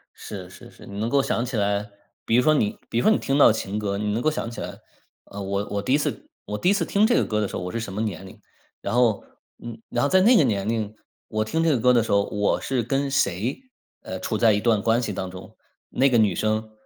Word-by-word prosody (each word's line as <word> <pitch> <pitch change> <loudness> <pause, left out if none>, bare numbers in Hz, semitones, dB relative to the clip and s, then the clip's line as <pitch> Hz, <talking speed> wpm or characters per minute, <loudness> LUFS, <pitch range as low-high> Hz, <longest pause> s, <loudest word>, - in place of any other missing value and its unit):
是 95 -4 -8
是 - - -13
是。 - - -15
你 100 +1 -8
能 115 +2 -1
够 140 +1 +3
想 120 - -1
起 125 -1 -4
来， 100 0 -1 0.3
比 115 - +1
如 125 - +5
说 155 0 +4
你 105 -8 0
比 - - -2
如 120 - +2
说 - - +5
你 - - +4
听 135 +1 -1
到 140 - +7
情 105 -1 -3
歌， 100 -1 -2
你 105 +1 -1
能 110 +3 -1
够 155 - +2
想 115 - -4
起 - - -7
来， - - -7 0.5
呃， 100 - -8
我 100 +1 -2
我 100 0 -1
第 130 +6 0
1 - - +5
次 150 - -3 0.2
我 105 - -4
第 180 - +1
1 200 - +5
次 190 -5 0
听 200 +5 +3
这 240 - +3
个 - - +2
歌 105 -1 -1
的 105 - 0
时 - - -7
候， - - -3
我 90 - -4
是 115 - -3
什 100 -4 -6
么 105 - -3
年 95 -4 -4
龄。 95 - -13 0.4
然 - - -3
后， 120 -4 +2 0.4
嗯， 120 -1 -8
然 - - -1
后 140 - +2
在 185 - +5
那 235 +6 +6
个 160 - +6
年 100 -5 0
龄 110 -2 -2 0.3
我 110 0 -1
听 160 +9 0
这 165 - +3
个 135 -6 +2
歌 125 +2 +4
的 120 - +4
时 - - -4
候， 100 0 +4
我 105 0 0
是 130 -3 -1
跟 135 +4 -1
谁， 110 - 0 0.4
呃， 95 - -6
处 110 +3 -2
在 110 -1 +4
一 105 - +1
段 110 -3 +2
关 115 +3 +2
系 105 -4 -3
当 95 0 -4
中。 90 0 -11 0.4
那 135 +2 +3
个 120 - +3
女 105 -4 +3
生 110 0 -1
110 Hz, 295 characters per minute, -24 LUFS, 100-125 Hz, 0.5 s, 到